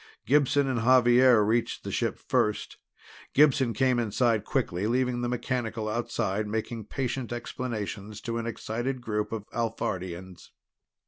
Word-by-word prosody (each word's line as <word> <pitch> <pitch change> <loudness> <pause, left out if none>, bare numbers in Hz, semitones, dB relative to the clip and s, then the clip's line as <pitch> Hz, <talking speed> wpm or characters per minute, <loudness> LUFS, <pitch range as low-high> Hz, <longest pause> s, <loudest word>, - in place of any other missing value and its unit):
Gibson 145 +1 +3
and 130 -3 0
Xavier 120 -2 +6
reached 115 +2 0
the - - -5
ship - - -1
first; 105 -1 -1 0.6
Gibson 135 -4 +5
came 125 +3 +2
inside 115 0 +1
quickly, 90 +4 -1
leaving 125 +1 +1
the 120 - -1
mechanical 120 -3 -2
outside 110 -2 -1
making 110 +1 -3
patient 125 0 -3
explanations 110 -4 -5
to 115 0 -3
an 115 - -4
excited 120 +3 -3
group 105 -3 -2
of 110 -2 -4
Alphardians. 95 -6 -4
115 Hz, 130 wpm, -28 LUFS, 110-125 Hz, 0.6 s, Xavier